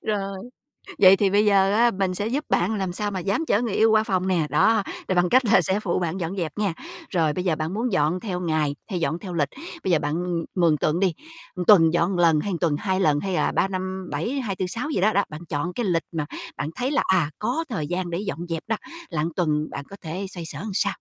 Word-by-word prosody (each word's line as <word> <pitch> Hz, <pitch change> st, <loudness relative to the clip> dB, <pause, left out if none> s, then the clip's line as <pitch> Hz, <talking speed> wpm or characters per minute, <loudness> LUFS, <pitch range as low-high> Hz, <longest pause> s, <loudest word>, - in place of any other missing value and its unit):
Rồi, 195 Hz, -2 st, -2 dB, 0.6 s
vậy 190 Hz, -1 st, +8 dB
thì 200 Hz, -, +2 dB
bây 205 Hz, +2 st, +3 dB
giờ 195 Hz, -1 st, +4 dB
á, 235 Hz, +2 st, +4 dB
mình 190 Hz, -2 st, -1 dB
sẽ 205 Hz, +3 st, -2 dB
giúp 280 Hz, +6 st, -2 dB
bạn 190 Hz, +6 st, +1 dB
làm 190 Hz, -3 st, -2 dB
sao 205 Hz, +2 st, -2 dB
mà 190 Hz, -, -3 dB
dám 200 Hz, -, -1 dB
chở 210 Hz, -, +2 dB
người 235 Hz, -5 st, -2 dB
yêu 220 Hz, +2 st, +4 dB
qua 220 Hz, 0 st, +4 dB
phòng 185 Hz, -3 st, -1 dB
nè. 170 Hz, -5 st, +1 dB
Đó, 210 Hz, +8 st, +3 dB, 0.2 s
rồi 185 Hz, -, 0 dB
bằng 175 Hz, 0 st, +3 dB
cách 255 Hz, +4 st, +4 dB
là 215 Hz, -3 st, +5 dB
sẽ 190 Hz, +4 st, 0 dB
phụ 190 Hz, -5 st, -1 dB
bạn 175 Hz, 0 st, -2 dB
dọn 175 Hz, +2 st, -3 dB
dẹp 165 Hz, -3 st, -3 dB
nha. 205 Hz, -4 st, 0 dB, 0.4 s
Rồi, 160 Hz, -5 st, +1 dB
bây 180 Hz, -, -3 dB
giờ 175 Hz, -4 st, +1 dB
bạn 155 Hz, +3 st, -3 dB
muốn 230 Hz, +4 st, -1 dB
dọn 175 Hz, -1 st, +1 dB
theo 185 Hz, -3 st, -4 dB
ngày, 155 Hz, -4 st, 0 dB
hay 185 Hz, -4 st, -2 dB
dọn 165 Hz, 0 st, -1 dB
theo 185 Hz, -2 st, -7 dB
lịch? 150 Hz, -4 st, 0 dB, 0.3 s
Bây 185 Hz, -, 0 dB
giờ 165 Hz, -, +4 dB
bạn, 145 Hz, 0 st, -2 dB
ừm, 170 Hz, -2 st, -2 dB
mường 170 Hz, -4 st, +3 dB
tượng 155 Hz, +4 st, 0 dB
đi, 190 Hz, -3 st, +2 dB, 0.5 s
tuần 165 Hz, -6 st, +7 dB
dọn 175 Hz, +2 st, +1 dB
lần, 165 Hz, -3 st, +4 dB
hay 200 Hz, +5 st, -2 dB
tuần 165 Hz, -4 st, +2 dB
2 190 Hz, -2 st, 0 dB
lần, 150 Hz, -6 st, +3 dB
hay 190 Hz, +4 st, -3 dB
là -, -, +1 dB
3-5-7, 185 Hz, -1 st, -2 dB
2-4-6 210 Hz, +3 st, -3 dB
gì 235 Hz, -, 0 dB
đó, 215 Hz, +3 st, +3 dB
đó. 200 Hz, -, +3 dB
Bạn 155 Hz, +1 st, -8 dB
chọn 155 Hz, +4 st, -2 dB
cái 240 Hz, -, -2 dB
lịch 170 Hz, -4 st, +1 dB
mà 160 Hz, -3 st, -2 dB, 0.3 s
bạn 145 Hz, -, -3 dB
thấy 255 Hz, +3 st, -1 dB
là, 295 Hz, -, +2 dB
à, 170 Hz, -5 st, +2 dB
có 320 Hz, +10 st, -1 dB
thời 160 Hz, -11 st, -3 dB
gian 180 Hz, +2 st, -2 dB
để 170 Hz, +1 st, -2 dB
dọn 200 Hz, -4 st, -4 dB
dẹp 165 Hz, -1 st, -3 dB
đó, 225 Hz, -, +1 dB, 0.3 s
là 150 Hz, -4 st, -1 dB
tuần 155 Hz, -3 st, 0 dB
bạn 140 Hz, -, -6 dB
có 200 Hz, -, -9 dB
thể 180 Hz, +4 st, -4 dB
xoay 175 Hz, -3 st, -7 dB
sở 155 Hz, -3 st, -7 dB
sao? -, -, +1 dB
185 Hz, 250 wpm, -24 LUFS, 165-200 Hz, 0.6 s, vậy